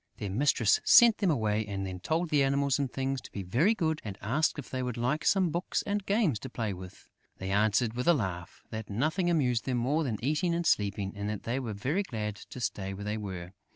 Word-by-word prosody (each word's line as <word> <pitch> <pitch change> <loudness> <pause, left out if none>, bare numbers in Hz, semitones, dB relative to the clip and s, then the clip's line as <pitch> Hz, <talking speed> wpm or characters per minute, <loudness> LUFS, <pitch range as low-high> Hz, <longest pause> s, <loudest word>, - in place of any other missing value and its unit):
Their 100 - -4
mistress 115 -1 +3
sent 235 -2 +7
them 200 -3 +2
away 110 -7 +1
and 100 -2 -4
then 95 -1 -5
told 160 - -1
the 145 -2 +4
Animals 140 0 +1
and 135 -3 -1
Things 135 0 -2
to - - -12
be 100 - -5
very 145 - +2
good 160 -5 -1
and 100 -2 -6
asked 140 +9 +1
them 145 - -5
if - - -16
they 130 - -2
would 125 -2 -3
like 135 +6 0
some 190 -4 +3
books 175 +3 -1
and 205 0 -1
games 200 - +2
to 130 - -7
play 110 -4 -3
with; 90 0 -11 0.3
they 95 0 -4
answered, 110 +3 +2
with 125 +4 -3
a 175 - +6
laugh, 90 - -4
that 110 -1 -6
nothing 155 - 0
amused 125 -8 +1
them 130 -2 0
more 140 +7 +1
than 120 -7 -2
eating 170 +4 +1
and 170 0 -1
sleeping 100 -6 +1
and 100 0 -3
that 105 -2 -4
they 120 +3 -1
were 120 -5 -4
very 135 - -1
glad 105 - -4
to 115 - -10
stay 95 -5 -3
where 100 +1 -7
they 105 +1 -2
were. 95 -3 -6
125 Hz, 240 wpm, -30 LUFS, 105-155 Hz, 0.3 s, sent